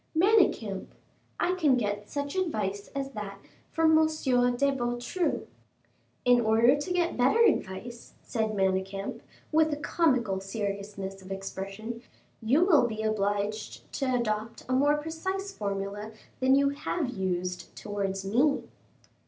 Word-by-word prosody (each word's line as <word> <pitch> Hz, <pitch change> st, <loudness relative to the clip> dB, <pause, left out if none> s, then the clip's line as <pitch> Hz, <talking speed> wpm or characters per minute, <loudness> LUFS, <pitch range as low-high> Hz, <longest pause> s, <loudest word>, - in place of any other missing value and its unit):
"Manicamp, 340 Hz, -, +3 dB, 0.5 s
I 360 Hz, -, +2 dB
can 310 Hz, -8 st, +3 dB
get 205 Hz, -2 st, -2 dB
such 285 Hz, +1 st, -3 dB
advice 210 Hz, -, -1 dB
as 275 Hz, 0 st, -3 dB
that 205 Hz, -4 st, -6 dB, 0.3 s
from 320 Hz, 0 st, +4 dB
M. 315 Hz, 0 st, +5 dB
de 260 Hz, -3 st, +2 dB
Beautru." 245 Hz, +7 st, -1 dB, 0.8 s
"In 245 Hz, -1 st, +6 dB
order 225 Hz, +4 st, +5 dB
to 290 Hz, +5 st, -4 dB
get 355 Hz, -1 st, +1 dB
better 265 Hz, -, +4 dB
advice," 235 Hz, -, -2 dB
said 220 Hz, -2 st, -1 dB
Manicamp, 195 Hz, 0 st, -1 dB, 0.3 s
with 315 Hz, 0 st, +4 dB
a 295 Hz, -, -1 dB
comical 255 Hz, -, +1 dB
seriousness 195 Hz, -1 st, -4 dB
of 190 Hz, +1 st, -11 dB
expression, 195 Hz, +4 st, -5 dB, 0.4 s
"you 270 Hz, +10 st, +4 dB
will 305 Hz, -10 st, +5 dB
be 220 Hz, -1 st, -4 dB
obliged 210 Hz, 0 st, -2 dB
to 275 Hz, -, 0 dB
adopt 220 Hz, -1 st, -2 dB
a 255 Hz, -, -1 dB
more 290 Hz, +3 st, +4 dB
precise 375 Hz, +6 st, -3 dB
formula 200 Hz, -, -4 dB, 0.3 s
than 260 Hz, +1 st, +4 dB
you 280 Hz, 0 st, +4 dB
have 285 Hz, 0 st, -2 dB
used 185 Hz, -4 st, -3 dB
towards 195 Hz, -2 st, -3 dB
me." 250 Hz, +9 st, +2 dB
235 Hz, 130 wpm, -28 LUFS, 200-290 Hz, 0.8 s, In